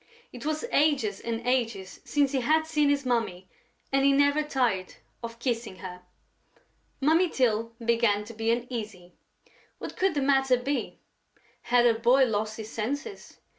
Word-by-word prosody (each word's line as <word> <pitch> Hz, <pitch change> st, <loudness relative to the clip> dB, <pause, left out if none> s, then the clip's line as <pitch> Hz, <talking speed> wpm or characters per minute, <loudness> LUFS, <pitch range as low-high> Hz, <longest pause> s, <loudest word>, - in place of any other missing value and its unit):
It 250 Hz, +4 st, -7 dB
was 310 Hz, +6 st, -1 dB
ages 280 Hz, -9 st, +2 dB
and 230 Hz, 0 st, -4 dB
ages 230 Hz, -7 st, -1 dB
since 285 Hz, -2 st, +1 dB
he 270 Hz, -2 st, 0 dB
had 315 Hz, +5 st, +2 dB
seen 300 Hz, -2 st, +2 dB
his 285 Hz, -1 st, +1 dB
Mummy 225 Hz, -7 st, -1 dB, 0.4 s
and 270 Hz, 0 st, +2 dB
he 280 Hz, -, +5 dB
never 285 Hz, +2 st, +3 dB
tired 245 Hz, -11 st, -1 dB, 0.3 s
of 230 Hz, -1 st, -7 dB
kissing 235 Hz, -4 st, -3 dB
her. 180 Hz, -1 st, -9 dB, 1.0 s
Mummy 325 Hz, +6 st, +3 dB
Tyl 230 Hz, -4 st, 0 dB
began 230 Hz, -3 st, +1 dB
to 225 Hz, +2 st, -10 dB
be 225 Hz, +1 st, -2 dB
uneasy. 220 Hz, -7 st, -3 dB, 0.6 s
What -, -, -7 dB
could 380 Hz, -3 st, +1 dB
the 285 Hz, -, +1 dB
matter 270 Hz, -2 st, +3 dB
be? 270 Hz, +3 st, -3 dB, 0.6 s
Had 240 Hz, 0 st, +3 dB
her 235 Hz, -, +5 dB
boy 255 Hz, +3 st, +5 dB
lost 215 Hz, -1 st, -2 dB
his 220 Hz, 0 st, -7 dB
senses? 285 Hz, -, -5 dB
245 Hz, 155 wpm, -27 LUFS, 225-280 Hz, 1.0 s, he